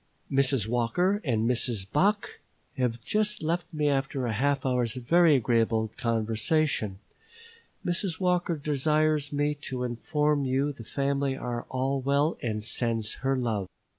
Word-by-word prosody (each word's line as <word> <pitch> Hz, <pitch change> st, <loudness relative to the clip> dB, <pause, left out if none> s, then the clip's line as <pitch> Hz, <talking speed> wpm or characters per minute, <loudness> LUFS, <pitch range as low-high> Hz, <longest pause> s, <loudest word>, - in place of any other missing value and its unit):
Mrs. 135 Hz, -5 st, +3 dB
Walker 175 Hz, -, +1 dB
and 115 Hz, -5 st, +1 dB
Mrs. 120 Hz, -4 st, 0 dB
Bache 200 Hz, -, +1 dB, 0.4 s
have 120 Hz, -3 st, -1 dB
just 210 Hz, -3 st, 0 dB
left 170 Hz, +2 st, -1 dB
me 150 Hz, -1 st, 0 dB
after 135 Hz, -2 st, 0 dB
a 115 Hz, -, -1 dB
half 140 Hz, +4 st, 0 dB
hour's 125 Hz, -3 st, +1 dB
very 160 Hz, +5 st, +4 dB
agreeable 115 Hz, -3 st, +1 dB
conversation. 115 Hz, 0 st, 0 dB, 0.9 s
Mrs. 175 Hz, -1 st, -1 dB
Walker 180 Hz, -2 st, +1 dB
desires 150 Hz, +1 st, +1 dB
me 145 Hz, 0 st, +1 dB
to 130 Hz, -3 st, -5 dB
inform 145 Hz, +4 st, 0 dB
you 135 Hz, +2 st, 0 dB
the 120 Hz, -, -10 dB
family 140 Hz, +2 st, -1 dB
are 120 Hz, -2 st, -4 dB
all 135 Hz, +1 st, -1 dB
well 140 Hz, +4 st, +2 dB
and 110 Hz, -3 st, -2 dB
sends 115 Hz, -1 st, -1 dB
her 135 Hz, 0 st, +1 dB
love. 110 Hz, -6 st, -1 dB
135 Hz, 135 wpm, -27 LUFS, 120-150 Hz, 0.9 s, very